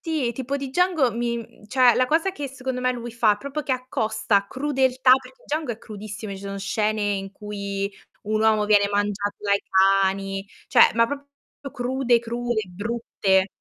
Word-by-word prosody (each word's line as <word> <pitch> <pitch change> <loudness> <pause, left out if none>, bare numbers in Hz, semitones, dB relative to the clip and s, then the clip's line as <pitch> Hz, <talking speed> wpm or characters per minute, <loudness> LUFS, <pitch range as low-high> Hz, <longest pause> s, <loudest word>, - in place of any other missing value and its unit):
ti 310 -7 -1
tipo 265 +3 -3
di 275 -1 -5
Django 325 -3 +2
mi 235 0 -1
mhmm, 220 -2 -12
cioè 250 0 +5
la 255 - +2
cosa 325 +7 +2
che 295 -7 -5
secondo 260 -1 -5
me 255 0 +1
lui 240 -1 -6
fa, 225 -2 +3
è - - -13
proprio 280 +5 -4
che 265 - 0
accosta 220 -5 0
crudeltà 260 -2 +1
perché - - -16
Django 305 - -2
è 225 - -11
crudissimo, 215 -1 -8
ci - - -8
sono 200 0 -5
scene 210 +2 -1
in 195 -1 -2
cui 200 -1 -4 0.4
un 215 0 +1
uomo 215 -1 +3
viene 205 -1 +4
mangiato 205 0 -1
dai 200 -1 +1 0.4
cani, 195 0 -1 0.2
cioè, - - +6
ma 230 0 +4
proprio 285 +1 -6 0.4
crude, 250 -2 +1
crude, 235 0 -2
brutte. 195 -1 0
235 Hz, 175 wpm, -24 LUFS, 205-260 Hz, 0.4 s, cioè